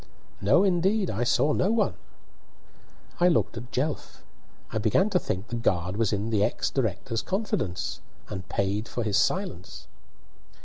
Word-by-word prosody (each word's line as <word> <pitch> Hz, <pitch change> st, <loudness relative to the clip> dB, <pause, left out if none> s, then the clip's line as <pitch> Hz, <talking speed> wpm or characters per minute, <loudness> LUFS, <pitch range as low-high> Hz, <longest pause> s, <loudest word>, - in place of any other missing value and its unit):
"No, 125 Hz, -, +5 dB
indeed; 190 Hz, +2 st, +2 dB
I 110 Hz, +4 st, -1 dB
saw 145 Hz, +5 st, +3 dB
no 185 Hz, -, +2 dB
one." 225 Hz, -1 st, +2 dB, 1.3 s
I 175 Hz, -, +5 dB
looked 170 Hz, -8 st, +2 dB
at 120 Hz, +2 st, -8 dB
Jelf. 145 Hz, +4 st, -3 dB, 0.5 s
I 110 Hz, -, -1 dB
began 150 Hz, -, +2 dB
to 180 Hz, -, +3 dB
think 95 Hz, -, -4 dB
the 120 Hz, -, -3 dB
guard 90 Hz, -5 st, 0 dB
was 110 Hz, -1 st, +1 dB
in 105 Hz, +2 st, -1 dB
the 105 Hz, -2 st, +3 dB
ex -, -, 0 dB
director's 115 Hz, -1 st, -1 dB
confidence, 185 Hz, -, -2 dB, 0.3 s
and 95 Hz, -2 st, -7 dB
paid 100 Hz, +3 st, -1 dB
for 120 Hz, -, -3 dB
his 105 Hz, -2 st, +1 dB
silence. 105 Hz, -, -2 dB
115 Hz, 150 wpm, -27 LUFS, -, 1.3 s, No